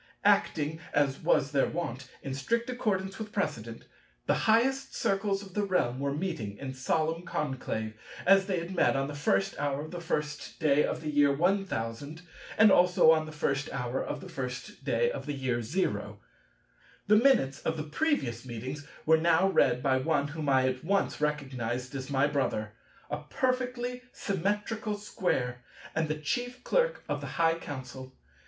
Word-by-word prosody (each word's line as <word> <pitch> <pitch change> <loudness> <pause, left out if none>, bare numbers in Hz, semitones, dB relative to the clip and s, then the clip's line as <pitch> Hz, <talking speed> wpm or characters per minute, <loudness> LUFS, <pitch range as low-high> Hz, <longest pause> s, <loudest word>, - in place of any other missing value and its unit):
Acting, 155 +1 +2 0.2
as 140 -2 +2
was 140 - +2
their 140 -2 +3
wont, 130 -6 -4
in 135 - -4
strict 230 - -1
accordance 195 -5 -1
with 215 -1 -6
precedent, 115 - -3 0.4
the - - +3 0.2
highest 265 +5 +3
Circles 195 0 0
of 190 -2 -12
the 210 - 0
realm 180 -11 +1
were 140 0 0
meeting 140 - -3
in 135 -1 -5
solemn 160 +5 0
conclave, 130 -9 -3 0.3
as 195 +1 +6
they 190 -3 0
had 170 +2 -4
met 175 - +3
on 135 0 0
the 145 - -6
first 185 +7 +1
hour 145 -1 -1
of 155 - -10
the 175 -1 -5
first 150 -3 -3
day 150 -2 +4
of - - -2
the 155 -1 -3
year 145 -1 +4
1000, 155 - -1 0.3
and 220 -2 +7
also 180 -3 +6
on 155 -1 +2
the - - -7
first 145 -2 -1
hour 125 -1 -2
of - - -4
the 185 - -9
first 130 -6 -6
day 475 0 +2
of - - -6
the 145 - -1
year 125 -3 -1
0. 170 - -2 0.9
The 210 - +5
minutes 215 - +4
of 160 - -2
the 155 - -2
previous 150 - -1
meetings 130 +4 -6 0.2
were 160 +1 +6
now 170 +3 +4
read 125 -9 +3
by 130 -2 +3
one 145 +1 +1
whom 150 -1 -3
I 130 -1 +4
at 130 0 -2
once 195 -2 0
recognized 130 -4 -2
as 135 0 -5
my 135 0 +3
brother, 135 -7 -1 0.4
a 150 - 0
perfectly 250 -1 -1
Symmetrical 210 +3 -1
Square, 125 -12 -2 0.3
and 160 0 0
the 155 - -1
Chief 245 - -3
Clerk - - +1
of - - -2
the - - -5
High 165 -1 +4
Council. 130 -2 -8
150 Hz, 175 wpm, -30 LUFS, 135-195 Hz, 0.9 s, and